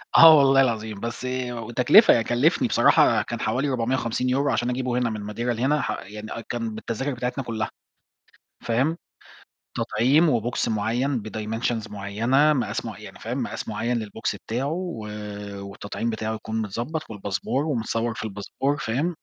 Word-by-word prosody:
آه 160 -1 +10
والله 135 -1 +6
العظيم. 110 -5 -1
بس 115 +3 -5 0.2
وتكلفة، 120 - +5
كلّفني 120 +8 +2
بصراحة - - +4
كان - - -5
حوالي 140 +3 0
450€ 125 +2 0
عشان 120 +1 0
أجيبه 125 0 -1
هنا 125 -1 +1
من 105 -1 -5
Madeira 115 - -12 0.2
لهنا 140 +6 +1
ح - - -2
يعني 105 +2 -8
آه 115 - -5
كان 115 -2 -3
بالتذاكر 115 +5 -3
بتاعتنا 125 +2 -3
كُلّها، 110 -3 -3 1.0
فاهم، 130 +8 +1 0.8
تطعيم 125 +5 +3
وBox 120 +3 -2
معيّن 115 +3 0
بdimensions 110 +1 -3
معيّنة، 115 +9 +2
مقاس 130 -4 -2
معيّ - - -7
يعني - - -11
فاهم، - - -3
مقاس - - -5
معيّن 115 -1 -1
للBox 105 +2 -3
بتاعُه 120 +5 -1
و 170 -9 -4 0.6
والتطعيم 100 +3 -4
بتاعُه 110 0 -2
يكون 110 0 -3
متضبط 120 +10 -4
والباسبور 105 +6 -2
ومتصور 115 -4 -1
في - - -5
الباسبور 110 +7 -2
فاهم. 150 +6 -1
120 Hz, 145 wpm, -24 LUFS, 110-135 Hz, 1.0 s, آه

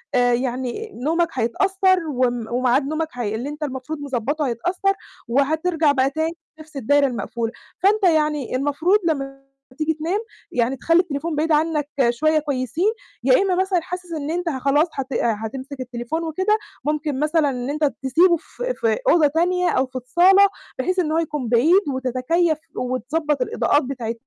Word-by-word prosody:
آآ 245 -1 +4
يعني 255 - -2
نومك 335 +4 +2
هيتأثّر 375 +10 +2
وم 245 -4 0
وميعاد 255 +2 +2
نومك 310 +2 -1
هي 225 -4 -3
اللي 245 +6 -4
أنت 300 +1 -6
المفروض 280 +2 -5
مضبّطه 285 +2 -2
هيتأثّر 360 - 0 0.3
وهترجع 315 +5 +2
بقى 265 -1 +2
تاني 320 +3 -2 0.2
لنَفْس 310 -1 -14
الدايرة 280 +3 +3
المقفولة. 235 -2 -3 0.3
فأنت 405 +2 +3
يعني 300 -7 +2
المفروض 290 +9 +2
لمّا 315 -4 +1 0.6
تيجي 315 +1 0
تنام 325 +6 -2 0.3
يعني 245 +2 0
تخلّي 330 +6 +3
التليفون 310 -1 -4
بعيد 315 +2 0
عنّك 305 -1 +1 0.2
شوية 310 +6 +2
كويسين، 290 - -1 0.3
يا - - +5
إمّا 385 -2 +1
مثلًا 375 -1 +1
حاسس 360 +1 -7
إن 305 -1 -3
أنت 345 0 -1
ه 265 - -3
خلاص 280 +5 +3
هت 270 -2 -4
هتمسك 240 +5 -2
التليفون 250 +5 -4
وكده 375 +7 +1 0.3
ممكن 295 -2 -1
مثلًا 305 0 +2
إن 250 -1 -4
أنت 305 +2 -2 0.2
تسيبه 340 +7 +4
في - - -5
في 225 - 0
أوضة 325 -3 +5
تانية 355 +4 +1
أو 260 - +2
في 260 0 -24
الصالة 360 +11 +5 0.3
بحيث 370 0 0
إن 320 -4 0
هو 320 - +1
يكون 300 -6 -2
بعيد 305 - +5
وتتكيّف 260 +6 +1 0.2
وتضبّط 265 +4 -1
الإضاءات 290 +3 +1
بتاعة 245 -4 -4
300 Hz, 160 wpm, -22 LUFS, 255-335 Hz, 0.6 s, يا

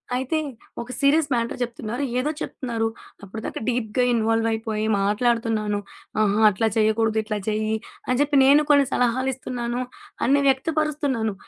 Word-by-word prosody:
అయితే 260 +5 -1 0.4
ఒక 235 +1 -8
serious 285 +2 +3
matter 235 0 -1
చెప్తున్నారు, 240 +2 -3 0.2
ఏదో 290 +4 0
చెప్తున్నారు. 230 -3 -2 0.4
అప్పటిదాకా 220 +3 -6
డీప్‌గా 240 0 0
ఇన్వాల్వయిపోయి 225 -1 0 0.2
మాట్లాడుతున్నాను. 215 0 +1 0.4
ఆహా! 210 0 +2
అట్లా 210 +3 0
చేయకూడదు, 220 0 +2
ఇట్లా 215 -1 -3
చెయ్యి 215 0 0 0.3
అని 250 - +1
చెప్పి 290 -1 +2
నేను 285 +3 +6
కొన్ని 285 -1 +5
సలహాలిస్తున్నాను 250 -1 -1 0.4
అన్ని 280 +3 +3
వ్యక్తపరుస్తున్నాను. 280 -5 0
235 Hz, 120 wpm, -23 LUFS, 220-265 Hz, 0.4 s, నేను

